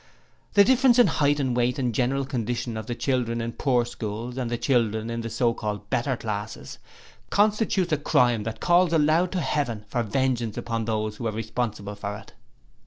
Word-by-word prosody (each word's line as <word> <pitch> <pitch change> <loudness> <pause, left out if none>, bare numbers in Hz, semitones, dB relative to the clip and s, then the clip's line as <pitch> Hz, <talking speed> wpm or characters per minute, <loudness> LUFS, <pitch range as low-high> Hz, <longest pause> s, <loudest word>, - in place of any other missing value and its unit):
The 200 - +7
difference 255 +2 +4
in 245 - +7
height 145 0 +2
and 130 -3 0
weight 125 0 +1
and 125 -4 -1
general 135 +4 0
condition 120 -2 -3
of 110 -1 -6
the 120 - -3
children 120 -3 -1
in 115 0 -3
poor 125 -1 +1
schools 115 +1 -5
and 125 -3 -2
the 120 - -1
children 115 -3 0
of 115 0 -3
the 115 - -5
so 120 0 +1
called 105 -2 -5
better 125 +1 0
classes, 105 -1 -5 0.5
constitutes 205 -4 +2
a - - +3
crime 125 -6 +2
that 110 +1 -5
calls 175 -1 +3
aloud 160 +3 +3
to 185 - 0
Heaven 120 -10 -2
for 120 - -1
vengeance 120 -1 -1
upon 115 -1 -2
those 110 -1 -2
who 115 - -3
are - - -1
responsible 110 -2 -3
for 100 0 -5
it. - - -15
120 Hz, 190 wpm, -25 LUFS, 110-140 Hz, 0.5 s, The